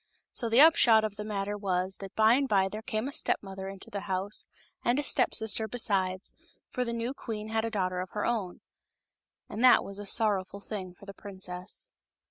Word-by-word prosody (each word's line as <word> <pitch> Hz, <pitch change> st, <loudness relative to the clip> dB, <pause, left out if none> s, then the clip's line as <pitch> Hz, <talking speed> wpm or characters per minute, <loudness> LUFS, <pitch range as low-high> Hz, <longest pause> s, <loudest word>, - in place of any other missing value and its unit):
So 235 Hz, -, -1 dB
the 235 Hz, +4 st, +6 dB
upshot 240 Hz, -9 st, +7 dB
of 215 Hz, -2 st, -2 dB
the 210 Hz, -, -5 dB
matter 205 Hz, -1 st, -3 dB
was 190 Hz, -2 st, -1 dB
that 195 Hz, 0 st, -9 dB
by 220 Hz, +1 st, +5 dB
and 270 Hz, +1 st, +1 dB
by 195 Hz, -2 st, +3 dB
there 215 Hz, +2 st, -6 dB
came 220 Hz, +2 st, -3 dB
a 280 Hz, -, -6 dB
step -, -, +1 dB
mother 190 Hz, -1 st, -7 dB
into 195 Hz, 0 st, -10 dB
the 200 Hz, -, -3 dB
house, 190 Hz, +2 st, -2 dB, 0.4 s
and 240 Hz, +2 st, +2 dB
a 295 Hz, -, 0 dB
step -, -, +3 dB
sister 220 Hz, 0 st, +1 dB
besides, 195 Hz, -5 st, -1 dB, 0.4 s
for 250 Hz, -, -1 dB
the 235 Hz, -, -3 dB
new 235 Hz, +2 st, -2 dB
queen 215 Hz, -5 st, -6 dB
had 220 Hz, 0 st, 0 dB
a -, -, -1 dB
daughter 185 Hz, -4 st, -1 dB
of 185 Hz, -, -6 dB
her 210 Hz, -, -2 dB
own. 210 Hz, -7 st, -2 dB, 0.9 s
And 220 Hz, +4 st, -4 dB
that 255 Hz, -, +7 dB
was 200 Hz, 0 st, -5 dB
a 205 Hz, -, -6 dB
son 220 Hz, +2 st, +3 dB
rowful 195 Hz, 0 st, -4 dB
thing 185 Hz, -4 st, -6 dB
for 200 Hz, -, -15 dB
the 200 Hz, -, -9 dB
princess. 185 Hz, -2 st, -9 dB
210 Hz, 215 wpm, -29 LUFS, 190-225 Hz, 0.9 s, upshot